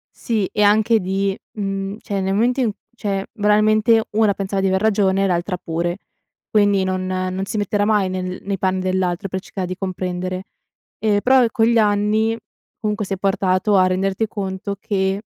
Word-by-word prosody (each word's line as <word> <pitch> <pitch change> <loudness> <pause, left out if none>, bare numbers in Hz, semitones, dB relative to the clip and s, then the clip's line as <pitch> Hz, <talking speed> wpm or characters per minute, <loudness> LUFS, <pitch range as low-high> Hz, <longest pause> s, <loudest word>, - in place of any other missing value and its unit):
Sì 215 -5 -1
e 210 - +1
anche 215 +2 +4
di 195 +1 -1 0.2
mhmm, 195 -1 -3
cioè 200 -3 -3
nel 190 0 0
momento 240 +6 +2
in 235 -4 +1 0.3
cioè, 195 -2 -1
banalmente, 215 +2 +3
una 210 -1 +3
pensava 195 0 -3
di 195 - +2
aver 190 0 +1
ragione 195 -3 +2
e - - +2
l'altra 180 +1 -1
pure, 175 +2 -3 0.5
quindi 205 -3 +3
non 185 0 -1
non 185 +1 -2
si 215 - -4
metterà 205 0 0
mai 210 -3 +2
nel 185 0 -4
nei 200 0 -2
panni 190 0 0
dell'altro 185 +1 -1
per 190 - -3
cercare 190 -1 -5
di 185 - -4
comprendere. 185 -1 -3 0.6
Ehm, 210 -2 +2
però, 260 +2 +5
con 225 -3 +2
gli 235 0 +3
anni 215 +1 +2 0.4
comunque 210 0 -2
sei 195 -1 -4
portato 195 +1 +1
a 185 -1 +5
renderti 190 +3 0
conto 200 -1 -4
che, 195 -1 -1
195 Hz, 175 wpm, -20 LUFS, 185-210 Hz, 0.6 s, però